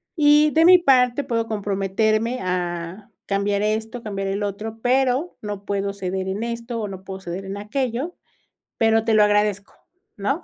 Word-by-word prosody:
"Y, 300 -1 +5
de 320 +2 +4
mi 365 +1 +9
parte, 260 -4 +3
puedo 230 -3 -1
comprometerme 215 +3 0
a, 180 +2 -3 0.2
cambiar 200 0 0
esto, 220 +3 -2
cambiar 195 -3 -4
el 195 +1 -2
otro, 210 +2 -4
pero, 260 +6 +1
no 205 -2 -6
puedo 200 0 -2
ceder 190 -1 -3
en 195 +3 -3
esto, 235 0 -4
o 210 - -3
no 190 -1 -8
puedo 190 0 -7
ceder 185 +2 -6
en 195 +1 -5
aquello, 255 +8 -3 0.6
pero 225 0 +3
te 225 - +1
lo 215 - +6
agradezco, 210 -1 +1 0.4
¿no?". 275 - -1
215 Hz, 165 wpm, -22 LUFS, 195-245 Hz, 0.6 s, mi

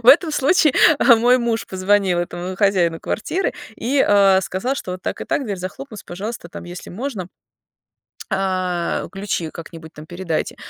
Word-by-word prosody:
В 235 - +2
этом 315 +5 +7
случае 295 +1 +3 0.4
мой 245 +2 +4
муж 235 -2 -1
позвонил 190 -1 +1
этому 175 +1 -4
хозяину 180 -5 +2
квартиры 355 - -2 0.2
и, 265 +4 +1
э, 195 -2 +5
сказал, 190 +9 -2
что 185 - -5
вот 185 0 -7
так - - -4
и - - -3
так, 285 - -1
дверь 205 -5 -3
захлопнусь, 205 +5 -7
пожалуйста, 195 0 -6
там, - - -9
если 175 +1 -9
можно 210 -3 -5 1.0
а, 185 -3 -1
ключи 195 -4 -3
как-нибудь 165 -1 -10
там 150 0 -11
передайте. 175 -1 -3
190 Hz, 155 wpm, -20 LUFS, 175-235 Hz, 1.0 s, этом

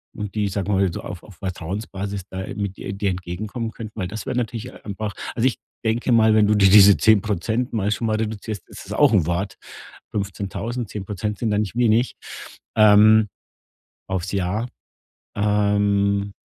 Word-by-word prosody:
und 105 -3 -5
die, 105 -1 +1
sagen 95 0 -3
wir 105 - +2
mal, 95 -1 +2
so - - -5
auf 90 - -7
auf 100 - -14
Vertrauensbasis 95 +2 -5
da, 95 - -5
äh, - - -7
mit 100 -2 -4
dir - - -6
dir 100 -1 -1
entgegenkommen 100 +6 -4
könnten? 110 -1 -9
Weil 90 - -1
das 110 +2 -6
wäre - - -2
natürlich 120 +1 -3
einfach 105 0 -4 0.2
also 115 - +1
ich 125 - -1 0.3
denke 115 +3 0
mal, 110 -1 +5
wenn 105 -1 +5
du 105 - +3
dir 100 -2 +5
diese 100 -1 +8
10% 110 +3 +2
mal 105 -2 0
schon 115 +2 -1
mal 110 - +1
reduzierst, 110 -2 -4
ist - - -10
das - - -6
auch - - +4
'n 95 -7 +4
Wort. 90 +3 -2 0.5
15.000, 100 +3 -4
10% 105 +1 -4
sind 115 -3 0
da 105 - +2
nicht 105 0 -2
wenig. 120 0 +2 0.6
Ähm. 110 0 +6 0.8
Auf's 95 0 -3
Jahr. 100 +5 -1 0.7
Ähm 100 -1 +1
105 Hz, 180 wpm, -22 LUFS, 100-110 Hz, 0.8 s, diese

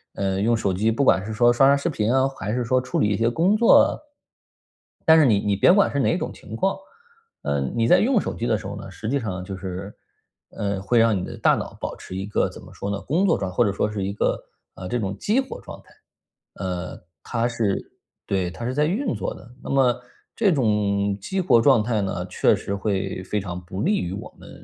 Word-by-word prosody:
呃， 95 -1 -1
用 115 +2 +3
手 100 -3 0
机， 110 +5 +1
不 125 +5 0
管 95 -6 +3
是 110 - -5
说 120 +2 +4
刷 135 +3 +5
刷 140 - +6
视 140 - -2
频 115 -4 0
啊， 130 0 +3
还 105 +4 -3
是 125 0 0
说 130 +2 +2
处 125 - -2
理 105 - +2
一 105 - 0
些 115 0 +1
工 180 - +2
作。 230 - +5 1.1
但 160 0 +7
是 155 - +5
你 105 -6 +4
你 100 -1 0
别 140 - +5
管 200 -1 +3
是 140 - -1
哪 165 +6 +2
种 - - -4
情 110 - -10
况， 195 +10 0 0.7
呃， 70 0 0 0.2
你 115 -1 +2
在 180 - +6
用 240 -2 +3
手 - - -4
机 120 - -3
的 110 -3 +2
时 - - -10
候 100 - -6
呢， 100 - -8
实 110 - -6
际 140 - +1
上 95 -6 -4
就 95 0 -6
是， 95 +2 -6 0.6
呃， 100 -2 -3
会 120 +5 +1
让 115 -2 +4
你 90 - -3
的 - - -8
大 - - +3
脑 - - -6
保 - - -3
持 95 - -9
一 95 - -3
个 105 - +1
怎 - - -12
么 - - -14
说 100 - -5
呢， 100 - -3
工 170 +8 +1
作 - - +3
状 95 -2 -3
态 - - -14
或 120 - +5
者 100 - 0
说 105 +2 -1
是 100 -2 -3
一 100 - -3
个， - - 0 0.4
呃， 90 - -7
这 120 - 0
种 100 -2 -3
激 225 +6 +1
活 265 - -8
状 - - -10
态。 - - -22 0.6
呃， 90 -1 -5 0.2
它 120 -1 -1
是 110 -5 -2 0.3
对， 95 -3 0
它 115 - -8
是 125 - -2
在 150 +1 +2
运 220 - -1
作 - - -3
的。 120 - -14
那 - - -7
么 125 -3 +2 0.3
这 210 -5 +3
种 100 -5 +1
激 190 - -2
活 140 -10 +4
状 125 -6 +5
态 110 -2 0
呢， 95 -2 -3
确 90 - +2
实 100 - -5
会 95 -2 -2
非 105 +2 -2
常 90 -2 -5
不 95 +2 -5
利 205 +5 +2
于 90 +1 -3
我 105 - -8
们， - - -13
110 Hz, 265 characters per minute, -23 LUFS, 100-130 Hz, 1.1 s, 但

